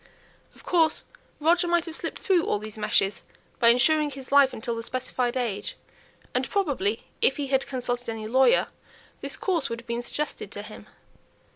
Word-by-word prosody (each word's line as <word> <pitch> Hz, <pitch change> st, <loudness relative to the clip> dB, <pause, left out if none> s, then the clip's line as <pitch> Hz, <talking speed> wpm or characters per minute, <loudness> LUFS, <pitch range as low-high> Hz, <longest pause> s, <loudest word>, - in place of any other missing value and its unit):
Of -, -, -17 dB
course 325 Hz, -3 st, +3 dB, 0.4 s
Roger 345 Hz, +3 st, +3 dB
might 345 Hz, -1 st, +2 dB
have 330 Hz, -2 st, -4 dB
slipped -, -, -3 dB
through 370 Hz, -6 st, +2 dB
all -, -, +1 dB
these 215 Hz, 0 st, -7 dB
meshes 200 Hz, -2 st, +1 dB, 0.4 s
by 235 Hz, -, +4 dB
insuring 295 Hz, +5 st, +4 dB
his 270 Hz, -2 st, -10 dB
life 280 Hz, -1 st, +6 dB
until 235 Hz, +1 st, -4 dB
the 230 Hz, -, -4 dB
specified 250 Hz, +1 st, -2 dB
age; 210 Hz, -5 st, -3 dB, 0.6 s
and, -, -, 0 dB
probably, 275 Hz, -, 0 dB, 0.2 s
if 270 Hz, -, +3 dB
he 285 Hz, -2 st, -3 dB
had 270 Hz, 0 st, +1 dB
consulted 245 Hz, -2 st, -3 dB
any 220 Hz, -1 st, -4 dB
lawyer, 265 Hz, -, +4 dB, 0.5 s
this -, -, -4 dB
course 335 Hz, -8 st, 0 dB
would 230 Hz, 0 st, -4 dB
have 235 Hz, -, -27 dB
been 235 Hz, 0 st, -2 dB
suggested 300 Hz, +5 st, -4 dB
to -, -, -6 dB
him. -, -, -11 dB
260 Hz, 175 wpm, -26 LUFS, 235-310 Hz, 0.6 s, life